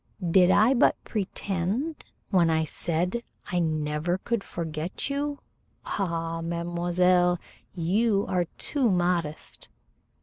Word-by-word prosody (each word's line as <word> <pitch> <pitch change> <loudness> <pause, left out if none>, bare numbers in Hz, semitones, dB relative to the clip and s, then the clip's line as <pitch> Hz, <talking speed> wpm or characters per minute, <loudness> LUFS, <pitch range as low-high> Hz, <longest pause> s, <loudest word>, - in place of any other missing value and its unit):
"Did 180 0 +6
I 215 +7 +5
but 255 - +4
pretend 205 - -2 0.3
when 175 -4 +4
I 160 0 +2
said 175 +7 -1 0.3
I 180 - +1
never 155 +1 0
could 230 +2 -2
forget 165 - -4
you? 285 +1 -1 0.5
Ah, 165 -3 -2
mademoiselle, 175 +1 +2 0.4
you 200 +4 +2
are 180 -1 +1
too 270 -5 +1
modest." 175 -4 -1
180 Hz, 105 wpm, -27 LUFS, 165-200 Hz, 0.5 s, Did